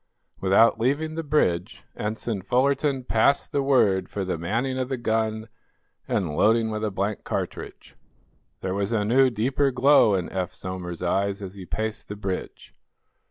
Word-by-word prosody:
Without 100 +4 +4
leaving 145 +7 0
the 165 - -3
bridge 110 - 0
Ensign 110 -1 -3
Fullerton 135 +5 +1
passed 125 +4 +2
the 140 - +1
word 105 -9 +2
for 100 -2 -3
the 90 - -1
manning 115 +11 -2
of 130 0 -2
the 130 - -2
gun 110 -1 -1 0.6
and 85 -6 -1
loading 110 +3 +3
with 110 0 -3
a 110 - +1
blank 100 +1 -3
cartridge. - - -5 0.7
There 95 - -2
was 100 +3 -1
a 105 -2 +1
new, 130 +4 +4
deeper 130 +5 +1
glow 130 -4 +5
in 90 -3 -2
Eph 95 -2 -3
Somers's 90 -2 -6
eyes 100 +3 0
as 95 -1 -7
he 95 -3 -10
paced 110 +3 -4
the 105 - -6
bridge. 95 -2 -5
110 Hz, 160 wpm, -25 LUFS, 95-130 Hz, 0.7 s, glow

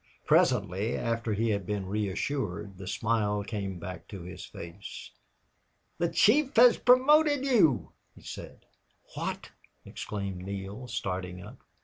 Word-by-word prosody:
Presently, 100 +6 +2
after 115 -1 -1
he 110 +2 +1
had 100 -1 -1
been 105 -2 -2
reassured, 100 -1 -3
the 95 - -8
smile 105 -1 0
came 100 -3 -4
back 90 0 -8
to 95 -4 -8
his 90 +1 -8
face. 85 +4 -9 0.9
"The 170 -1 +2
chief 270 - +4
has 245 +1 +8
promoted 285 +3 +5
you," 205 - +3 0.2
he - - -16
said. - - -9 0.5
"What!" - - -4 0.3
exclaimed 100 -3 -5
Neale, 100 +5 -6
starting 90 -5 -4
up. - - -12
105 Hz, 125 wpm, -29 LUFS, 95-135 Hz, 0.9 s, has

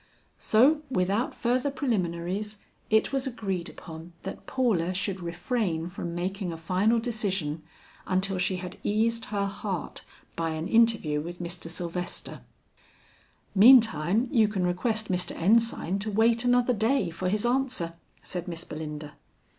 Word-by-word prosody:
So 275 +8 +4
without 200 0 0
further 255 +3 +1
preliminaries, 205 - -2 0.3
it 220 +4 +3
was 270 0 +1
agreed 195 -8 -3
upon 165 +1 -10
that 190 - -7
Paula 190 -9 +1
should 195 0 -2
refrain 175 -1 -2
from 170 -2 -5
making 185 +1 -2
a 165 - -6
final 190 +8 +2
decision 190 -10 -2 0.5
until 190 0 +1
she 185 +1 +1
had 180 0 -7
eased 225 +2 +1
her 200 -1 -1
heart 195 -3 -4 0.3
by 165 -1 -1
an 160 +2 -3
interview 225 -10 +3
with 175 +3 -7
Mr. 175 -1 -5
Sylvester. 175 +1 -5 1.1
"Meantime, 220 - +6
you 225 -6 +4
can 195 -4 -1
request 215 +4 0
Mr. 180 0 -1
Ensign 200 -1 +2
to 210 +2 -3
wait 225 +3 +3
another 245 0 +3
day 225 -2 +1
for 180 +2 -2
his 210 +3 0
answer," 245 -9 0 0.3
said 180 -1 -5
Miss 170 -1 -4
Belinda. 150 -2 -7
195 Hz, 140 wpm, -27 LUFS, 175-230 Hz, 1.1 s, Meantime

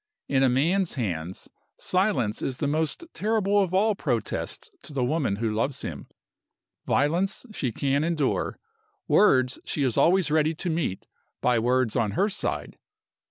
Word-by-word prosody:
In 135 -1 +2
a 135 - +5
man's 165 +9 +1
hands 90 - -4 0.3
silence 165 - 0
is 130 -2 -2
the 145 - -1
most 155 - -1
terrible 205 -1 +1
of 190 -3 0
all 210 +4 +3
protests 120 - -3
to 150 - -13
the 135 -3 0
woman 140 -5 0
who 110 +1 -1
loves 125 +5 -1
him. - - -6 0.8
Violence 175 - +1
she 130 - -2
can 140 +4 0
endure. 160 -4 0 0.5
Words 130 -11 +4
she 145 - -1
is 125 -4 0
always 175 -2 +4
ready 155 +1 +2
to 175 +2 -3
meet 155 - -2 0.3
by 125 -2 +2
words 125 0 +1
on 110 -5 +1
her 200 - +2
side. 205 - -3
145 Hz, 155 wpm, -26 LUFS, 125-180 Hz, 0.8 s, a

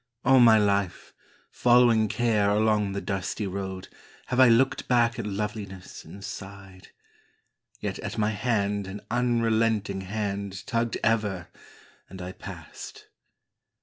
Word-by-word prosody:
All 135 0 +6
my 115 -2 +7
life, 100 -3 0 0.4
Following 120 -3 +4
Care 110 -3 +1
along 105 -1 +2
the 100 - -3
dusty 100 +2 -3
road, 95 -1 -5 0.4
Have 125 - 0
I 130 - +8
looked 120 +3 +3
back 120 -2 +2
at 110 - -3
loveliness 100 -2 -5
and 95 +5 -10
sighed; 95 -2 -10 0.9
Yet - - -4
at - - -5
my 105 0 +1
hand 105 -4 -1
an 100 +2 -7
unrelenting 115 -4 +1
hand 100 -1 -4
Tugged 115 0 -1
ever, 105 -6 0 0.6
and 95 - -10
I 90 0 -6
passed. - - -10
105 Hz, 125 wpm, -26 LUFS, 100-115 Hz, 0.9 s, I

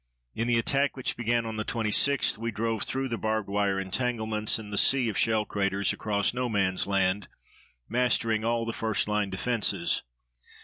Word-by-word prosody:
In 115 - -2
the 120 -1 +3
attack 140 +5 +1
which 130 - -1
began 120 0 0
on 110 -1 -5
the 110 - -1
26th 115 +5 +2
we 115 +1 -2
drove 115 0 -2
through 135 0 -1
the 115 -3 -4
barbed 110 -1 -1
wire 100 -1 0
entanglements 110 +1 -1
and 105 -2 -9
the - - -1
sea 130 -4 +3
of 105 - -4
shell 110 0 +2
craters 100 -1 0
across 100 -1 0
No 125 0 -2
Man's 95 -4 +1
Land, 100 0 +1 0.6
mastering 115 -2 +1
all 115 0 0
the 115 - -3
first 110 -2 0
line 105 -1 0
defenses. 100 -3 0
110 Hz, 175 wpm, -27 LUFS, 100-120 Hz, 0.6 s, the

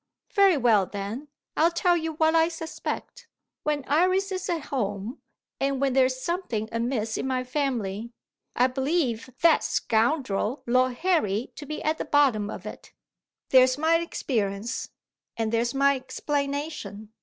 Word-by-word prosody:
"Very 395 -5 +5
well, 220 -7 +3
then; 205 +8 -5 0.3
I'll 325 +2 +4
tell 350 +1 +2
you 325 -1 -2
what 315 +1 +2
I 325 0 +5
suspect. 335 +8 -6 0.3
When 295 -3 -1
Iris 370 +6 +2
is 370 -1 -3
at 335 -2 0
home, 210 -1 -3 0.4
and 275 -1 0
when 275 -1 +1
there's 255 0 +3
something 260 - -2
amiss 230 -1 -1
in - - -2
my 255 -1 0
family, 235 -6 -2 0.4
I 245 - +4
believe 260 -2 0
that 335 - +5
scoundrel 230 0 0
Lord 255 +1 +2
Harry 245 - 0
to 290 - -9
be 305 - -5
at 310 +1 0
the - - -2
bottom 255 -9 +3
of 190 - -7
it. 215 - -9 0.6
There's 255 0 +5
my 320 +2 +3
experience, 230 -9 -2 0.5
and 225 -1 -1
there's 235 +2 +1
my 280 0 +4
explanation. 280 -4 -4
265 Hz, 145 wpm, -26 LUFS, 230-315 Hz, 0.6 s, Very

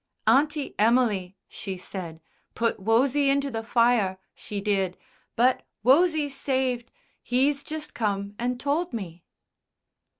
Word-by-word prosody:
"Auntie 295 +1 +2
Emily," 210 -5 +2
she 195 -2 -6
said, 175 -3 -7 0.3
"put 230 -1 0
Wosie 260 +7 +3
into 280 0 +1
the 225 -1 -3
fire, 230 -5 +2 0.2
she 205 - -6
did. 195 -3 0 0.4
But 250 +2 +3 0.2
Wosie's 295 +2 +4
saved.... 260 -3 -1 0.3
He's 275 +3 +1
just 305 +1 -6
come 200 -2 -2
and 245 +1 -1
told 300 +7 -1
me." 180 -6 -6
240 Hz, 120 wpm, -26 LUFS, 200-275 Hz, 0.4 s, Wosie's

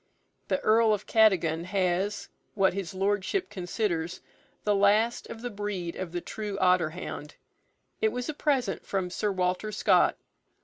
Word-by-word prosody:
The - - +1
Earl 220 0 +4
of 205 - -9
Cadogan 175 -7 +3
has, 190 +2 0 0.3
what 195 -3 +3
his 190 -2 -5
Lordship 205 - 0
considers, 180 -3 -2 0.4
the 210 - +2
last 210 +4 +3
of 225 - -9
the 245 - -3
breed 200 -5 -4
of 185 -3 -5
the 175 0 -3
true 210 0 -5
otter 180 -4 +3
hound. 155 -2 -7 0.7
It 440 0 +3
was 250 0 -4
a 310 - -2
present 270 -8 0
from 190 -2 -2
Sir 210 +3 -1
Walter 185 +3 -1
Scott. 210 - +3
200 Hz, 150 wpm, -28 LUFS, 180-215 Hz, 0.7 s, Earl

